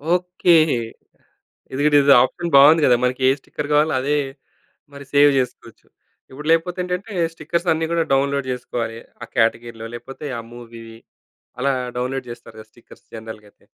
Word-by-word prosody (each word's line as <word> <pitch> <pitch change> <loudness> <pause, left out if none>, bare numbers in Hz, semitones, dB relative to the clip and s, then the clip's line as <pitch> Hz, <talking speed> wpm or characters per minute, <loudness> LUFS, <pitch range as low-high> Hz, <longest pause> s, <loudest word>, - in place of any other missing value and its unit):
Okay. 180 -1 +2 1.2
ఇది 140 - -2
గిడిది 145 -2 +5
option 170 +5 -4
బావుంది 150 +4 +7
గదా! 125 - +5
మనకే 130 +1 +2
స్టిక్కర్ 145 +2 -7
కావాలో 150 +2 +3
అదే 145 +2 0 0.8
మరి 140 0 -11
సేవ్ 145 0 +6
చేసుకోవచ్చు. 125 - -6 0.4
ఇప్పుడు 150 +3 -9
లేపోతే 170 +2 +1
ఏంటంటే, 180 +4 -5 0.2
స్టిక్కర్స్ 170 +2 -3
అన్నీ 160 +1 -2
గూడా 170 -1 +1
డౌన్‌లోడ్ 140 0 0
జేసుకోవాలి. 115 -2 -5 0.2
ఆ - - -5
క్యాటగరీ‌లో, 115 0 -1
లేపోతే 135 +5 -10
ఆ - - -6
మూవీ 115 -1 -11 0.8
అలా 140 +2 +1 0.3
డౌన్‌లోడ్ 130 +1 -3
జేస్తారుగా 110 -2 -12
స్టిక్కర్స్ 120 - -19
జనరల్‌గా 110 -2 -10
అయితే. - - -31
140 Hz, 140 wpm, -20 LUFS, 120-155 Hz, 1.2 s, బావుంది